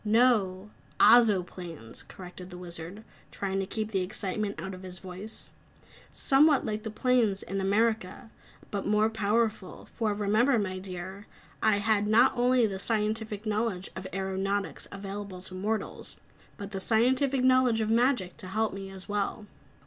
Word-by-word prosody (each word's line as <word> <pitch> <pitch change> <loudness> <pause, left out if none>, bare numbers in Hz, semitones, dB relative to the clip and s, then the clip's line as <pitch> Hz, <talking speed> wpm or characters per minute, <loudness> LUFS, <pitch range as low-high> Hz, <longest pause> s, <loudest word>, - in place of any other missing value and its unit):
"No, 210 -4 +2 0.3
Ozoplanes," 180 - +3
corrected 180 0 -11
the 180 - -9
Wizard, 175 +3 -8 0.3
trying 195 -1 -2
to 195 - -2
keep 215 +1 -3
the 190 -3 +1
excitement 200 +2 -3
out 190 0 -5
of 185 - -9
his 185 -1 -8
voice. 190 +4 -9 0.6
"Somewhat 285 +1 +4
like 215 -1 -2
the 220 - -5
planes 220 -3 +1
in 195 0 -3
America, 215 +2 0 0.4
but 200 -1 -3
more 210 +1 +3
powerful, 220 -1 -1
for 215 -3 0
remember, 215 +6 +3
my 185 -3 -2
dear, 190 +2 -7 0.3
I 215 -2 +4
had 210 0 +1
not 230 +5 +5
only 245 -1 +4
the 195 -3 -3
scientific 215 0 -2
knowledge 210 -3 -1
of 185 0 -6
aeronautics 195 +1 -2
available 200 -1 -6
to 185 - -7
mortals, 210 +4 -4 0.4
but 200 0 -7
the 195 - -3
scientific 255 +6 +2
knowledge 255 -3 +4
of 220 0 0
magic 235 -6 +2
to 185 - -8
help 215 +2 0
me 195 0 -6
as 190 -1 -10
well!" 205 +1 -2
205 Hz, 150 wpm, -29 LUFS, 190-225 Hz, 0.6 s, not